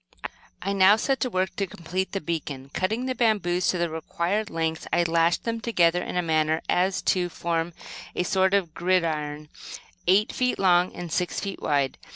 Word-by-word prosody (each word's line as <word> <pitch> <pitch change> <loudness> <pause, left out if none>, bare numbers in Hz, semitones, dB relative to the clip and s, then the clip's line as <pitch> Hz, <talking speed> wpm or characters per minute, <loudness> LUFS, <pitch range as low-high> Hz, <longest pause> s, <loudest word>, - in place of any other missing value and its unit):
I 195 - -1
now 195 +1 +6
set 265 +4 0
to 255 - 0
work 185 -4 -1
to 195 - -1
complete 180 +3 -4
the 195 - -2
beacon. 145 -4 -4
Cutting 220 +7 -1
the 260 - -1
bamboos 205 -7 +1
to 180 - +2
the 170 0 +1
required 170 +6 -2
lengths, 160 -1 -2
I 175 - +3
lashed 165 0 +2
them 230 -1 -3
together 175 -7 +2
in - - -5
such - - +2
a - - -7
manner 155 0 +1
as 185 +2 +1
to 180 -1 +1
form 170 0 -2 0.4
a - - +1
sort 190 +1 +2
of 180 -5 0
gridiron, 155 -4 -1 0.6
eight 195 +4 +4
feet 250 0 0
long 180 -1 +3
and 175 -2 -6
six 180 +1 -1
feet 195 -1 -5
wide. 140 -3 0
180 Hz, 190 wpm, -25 LUFS, 165-195 Hz, 0.6 s, now